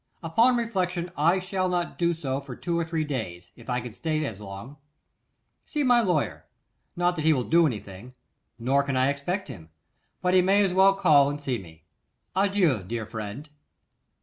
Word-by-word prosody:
Upon 230 Hz, +10 st, +3 dB
reflection, 180 Hz, -6 st, -2 dB
I 170 Hz, +6 st, +3 dB
shall 185 Hz, 0 st, -2 dB
not 175 Hz, -1 st, -2 dB
do 170 Hz, -1 st, +2 dB
so 135 Hz, -4 st, -3 dB
for 135 Hz, -3 st, -9 dB
two 170 Hz, +5 st, -3 dB
or 170 Hz, -, +1 dB
three 160 Hz, -1 st, -2 dB
days, 95 Hz, -12 st, -5 dB
if 120 Hz, +1 st, -14 dB
I 125 Hz, 0 st, 0 dB
can 120 Hz, -2 st, -8 dB
stay 155 Hz, +3 st, -2 dB
as 110 Hz, -7 st, -6 dB
long. 105 Hz, +7 st, -9 dB, 0.9 s
See 300 Hz, -2 st, -2 dB
my 245 Hz, -2 st, +5 dB
lawyer; 180 Hz, -9 st, -1 dB, 0.5 s
not 175 Hz, 0 st, +1 dB
that -, -, -1 dB
he 160 Hz, 0 st, +5 dB
will 130 Hz, -4 st, 0 dB
do 165 Hz, +5 st, +4 dB
anything; 105 Hz, 0 st, -7 dB, 0.4 s
nor 130 Hz, +4 st, +2 dB
can 140 Hz, -2 st, -2 dB
I 130 Hz, +1 st, +3 dB
expect 175 Hz, +8 st, -3 dB
him; 90 Hz, -, -10 dB, 0.5 s
but 180 Hz, 0 st, 0 dB
he 185 Hz, -, +6 dB
may 200 Hz, +2 st, +4 dB
as 185 Hz, -, -1 dB
well 195 Hz, +1 st, +5 dB
call 150 Hz, -8 st, +5 dB
and 145 Hz, +1 st, -4 dB
see 130 Hz, -5 st, -2 dB
me. 80 Hz, -4 st, -14 dB, 0.5 s
Adieu, 190 Hz, -, +2 dB
dear 110 Hz, +4 st, -4 dB
friend. 110 Hz, +6 st, -7 dB
155 Hz, 185 wpm, -26 LUFS, 125-180 Hz, 0.9 s, he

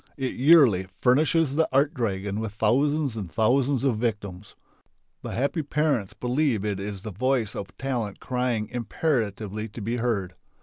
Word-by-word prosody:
It 130 Hz, -2 st, -2 dB
yearly 130 Hz, -, +5 dB
furnishes 150 Hz, +3 st, +3 dB
the 160 Hz, +2 st, +2 dB
art 140 Hz, +4 st, +3 dB
dragon 100 Hz, -, -2 dB
with 110 Hz, -2 st, -4 dB
thousands 135 Hz, +5 st, +1 dB
and 100 Hz, -6 st, -5 dB
thousands 130 Hz, -, +2 dB
of 125 Hz, -6 st, +1 dB
victims. 105 Hz, -4 st, -4 dB, 0.7 s
The -, -, -6 dB
happy 140 Hz, +6 st, 0 dB
parents 145 Hz, -8 st, 0 dB
believe 125 Hz, -4 st, 0 dB
it 100 Hz, -2 st, -2 dB
is 100 Hz, -1 st, -6 dB
the 110 Hz, -, -5 dB
voice 120 Hz, +1 st, 0 dB
of 100 Hz, -1 st, -7 dB
talent 120 Hz, -7 st, -3 dB
crying 125 Hz, -4 st, -1 dB
imperatively 110 Hz, -4 st, -2 dB
to 110 Hz, -, -9 dB
be 115 Hz, +3 st, -2 dB
heard. 105 Hz, -7 st, -1 dB
120 Hz, 150 wpm, -25 LUFS, 105-135 Hz, 0.7 s, yearly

